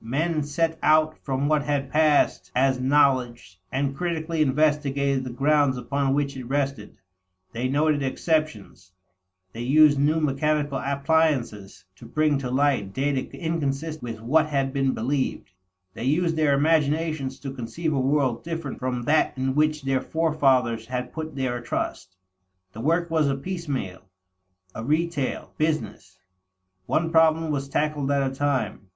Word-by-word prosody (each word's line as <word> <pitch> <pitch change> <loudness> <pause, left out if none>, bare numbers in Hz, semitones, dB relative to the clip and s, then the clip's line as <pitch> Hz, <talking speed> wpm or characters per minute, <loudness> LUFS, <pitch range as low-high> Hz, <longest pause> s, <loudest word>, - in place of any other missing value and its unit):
Men 155 +7 -1
set 160 +3 -1
out 155 0 +3
from 135 0 -2
what 155 -1 +2
had 145 -2 -2
passed 150 - +2
as 130 0 +2
knowledge, 130 -8 +1
and 135 +1 -1
critically 165 -1 -2
investigated 140 -2 +1
the 130 - -5
grounds 140 +1 +2
upon 140 +1 -1
which 140 -1 -1
it 130 -2 -7
rested; 135 -4 -3 0.6
they 120 +2 -1
noted 145 +2 +1
exceptions; 130 - -2 0.6
they 115 - -6
used 145 +3 +5
new 150 +3 +2
mechanical 145 -1 0
appliances 140 - 0
to 115 - -12
bring 150 +2 +1
to 130 -2 -4
light 130 -7 +1
data 135 0 0 0.2
inconsistent 160 -2 -3
with 115 -2 -6
what 155 +7 +2
had 135 -3 -1
been 135 -1 0
believed; 130 -3 -2 0.4
they - - -7
used 165 +4 +1
their 150 -3 +3
imaginations 155 -2 +1
to 135 -1 -6
conceive 135 +7 -3
a 140 - 0
world 130 -3 +1
different 165 -4 -5
from 125 -1 -2
that 150 +1 +2
in 130 0 -1
which 155 0 +1
their 135 -1 0
forefathers 130 -8 +1
had 125 0 -4
put 160 -1 -6
their 125 -3 -2
trust. 95 -5 -4 0.6
The 110 - -7
work 165 +5 0
was 155 -3 +2
a 135 - +1
piecemeal, 140 - -4 0.7
a 110 - -6
retail, 155 0 -1
business. 155 - -2 0.7
One 165 +1 0
problem 160 -1 +3
was 140 -1 -3
tackled 150 -1 -1
at 140 -2 +1
a - - -9
time. 135 -7 -2
140 Hz, 145 wpm, -24 LUFS, 130-155 Hz, 0.7 s, used